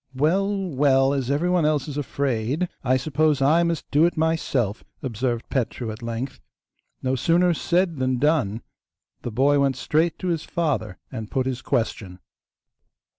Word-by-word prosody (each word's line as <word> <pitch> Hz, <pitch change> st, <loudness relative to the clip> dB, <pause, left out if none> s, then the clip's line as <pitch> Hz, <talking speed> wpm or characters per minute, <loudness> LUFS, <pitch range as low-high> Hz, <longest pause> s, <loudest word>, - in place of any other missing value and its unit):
'Well, 180 Hz, +9 st, +2 dB, 0.2 s
well, 135 Hz, -1 st, +3 dB
as 135 Hz, -3 st, -2 dB
everyone 175 Hz, +4 st, +2 dB
else 150 Hz, -1 st, +1 dB
is 145 Hz, -, -5 dB
afraid, 140 Hz, +2 st, -1 dB, 0.2 s
I 130 Hz, 0 st, +3 dB
suppose 150 Hz, +2 st, +1 dB
I 150 Hz, +5 st, +4 dB
must 170 Hz, -2 st, -1 dB
do 150 Hz, +2 st, +4 dB
it 175 Hz, -, -4 dB
myself,' 140 Hz, -9 st, 0 dB, 0.2 s
observed 120 Hz, -1 st, -2 dB
Petru 120 Hz, -2 st, -2 dB
at 110 Hz, +2 st, -9 dB
length. 120 Hz, +3 st, -4 dB, 0.6 s
No 130 Hz, 0 st, +1 dB
sooner 170 Hz, +6 st, +3 dB
said 175 Hz, 0 st, 0 dB
than 130 Hz, -1 st, 0 dB
done; 130 Hz, -7 st, +1 dB, 0.6 s
the 120 Hz, -, -5 dB
boy 140 Hz, +5 st, +3 dB
went 135 Hz, -1 st, +2 dB
straight 160 Hz, +6 st, +1 dB
to 185 Hz, -, -3 dB
his 165 Hz, -3 st, 0 dB
father 155 Hz, -, -2 dB
and 110 Hz, -4 st, -6 dB
put 130 Hz, -1 st, 0 dB
his 130 Hz, -1 st, -3 dB
question. 105 Hz, -6 st, -2 dB
140 Hz, 155 wpm, -24 LUFS, 125-160 Hz, 0.6 s, I